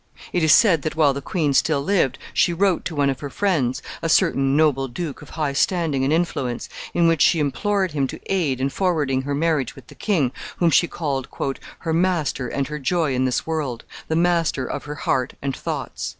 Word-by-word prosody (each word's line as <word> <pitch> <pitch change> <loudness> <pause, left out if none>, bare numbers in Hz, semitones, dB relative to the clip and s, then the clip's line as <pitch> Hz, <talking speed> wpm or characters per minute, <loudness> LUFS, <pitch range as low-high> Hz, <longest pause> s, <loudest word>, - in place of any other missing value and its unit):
It 180 - +1
is 160 - +5
said 180 -7 +6
that 155 - -3
while 150 -3 +4
the 140 - -5
queen 150 -1 0
still 140 0 +2
lived 145 -7 +1 0.2
she 175 - +3
wrote 185 0 +1
to 165 - -4
one 140 -1 +2
of 130 - -6
her 145 - -5
friends 145 -8 0 0.2
a 165 - -1
certain 135 -2 +3
noble 140 -4 +3
duke 145 +3 -5
of 150 - -12
high 150 -3 0
standing 155 -3 +1
and 135 - +1
influence 155 -7 -1 0.3
in 170 -1 +4
which 165 -3 +2
she 165 - +5
implored 190 +7 0
him 140 -3 0
to - - -8
aid 160 -10 0
in 135 +1 0
forwarding 150 -6 0
her 140 +1 -3
marriage 150 -4 0
with - - -13
the - - -14
king, 160 - 0 0.3
whom 170 -2 +3
she 175 - +4
called 140 -7 -3 0.5
"her 165 -2 -1
master 165 -7 0
and 140 +3 -2
her 150 0 -5
joy 155 0 0
in 130 +1 +1
this 130 - 0
world 150 -7 -3 0.2
the 160 - -1
master 165 -5 +1
of - - -5
her 150 0 -5
heart 130 -3 -1
and 135 -1 -3
thoughts." - - -4
150 Hz, 210 wpm, -22 LUFS, 135-170 Hz, 0.5 s, said